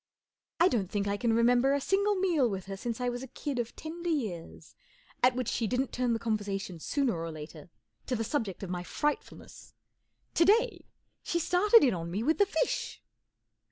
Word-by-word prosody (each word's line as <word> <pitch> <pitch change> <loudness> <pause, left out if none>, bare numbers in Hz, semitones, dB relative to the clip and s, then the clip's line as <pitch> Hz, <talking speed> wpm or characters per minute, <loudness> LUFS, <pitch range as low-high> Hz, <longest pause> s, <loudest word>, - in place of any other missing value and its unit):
I 345 - +6
don't 210 - 0
think 205 0 -1
I 200 - 0
can 235 +2 0
remember 245 +4 +4
a - - +1
single 400 +7 +1
meal 345 -10 +2
with 195 -3 -4
her 195 0 -5
since 230 +4 -4
I 250 - -1
was 245 0 -2
a 265 - -7
kid 275 +1 -4
of 235 -1 -3
tender 340 +2 -5
years 215 - -4 0.5
at 250 0 +4
which 255 -3 -2
she 230 - 0
didn't 250 +3 -1
turn 245 -1 0
the 225 - -1
conversa¬ 205 -3 -1
tion 180 -3 -8
sooner 275 - 0
or 165 0 -4
later 155 +1 -10 0.4
to 255 - 0
the 225 - -1
subject 220 -7 -2
of 185 - -5
my 180 -1 -2
frightfulness. 295 +11 -4 0.6
To 335 - +4
day, 460 +6 +3 0.4
she 340 - -1
started 380 +7 +5
in 255 -5 +4
on 170 -1 -4
me 200 +6 -2
with 315 - +1
the 405 - +5
fish. - - -1
245 Hz, 200 wpm, -30 LUFS, 200-305 Hz, 0.6 s, I